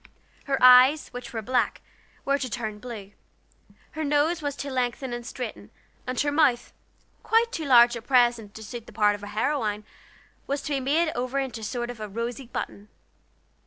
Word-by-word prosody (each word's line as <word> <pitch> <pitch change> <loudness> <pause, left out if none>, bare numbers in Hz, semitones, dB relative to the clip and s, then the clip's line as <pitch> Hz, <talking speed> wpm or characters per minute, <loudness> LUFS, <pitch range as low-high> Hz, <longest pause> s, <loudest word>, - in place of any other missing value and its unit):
Her 275 -1 0
eyes, 255 +4 +7
which 245 +1 -8
were 225 -3 -4
black, 250 +2 0 0.5
were 280 +1 +1
to 260 -2 -3
turn 220 -3 -4
blue; 210 -4 -8 0.8
her 315 - -4
nose 295 +3 +1
was 285 -2 -3
to 280 -1 -5
lengthen 255 0 -2
and 240 0 -5
straighten, 240 -1 -7 0.4
and 255 0 -2
her 290 - 0
mouth, 280 -5 +2 0.5
quite 460 +1 +2
too 320 -9 -4
large 240 -2 +6
at 235 0 -9
present 240 -5 +2
to 220 - -8
suit 230 +2 -8
the - - -13
part 210 0 +3
of 205 - -7
a 205 - -7
heroine, 215 -1 -1 0.6
was 280 0 -2
to 300 - -3
be 275 - +1
made 310 +5 +1
over 255 +2 -3
into 260 -4 -3
a - - -8
sort 240 +2 -3
of 240 - -12 0.2
rosy 235 +2 -4
button. 205 -3 -6
250 Hz, 185 wpm, -26 LUFS, 230-280 Hz, 0.8 s, eyes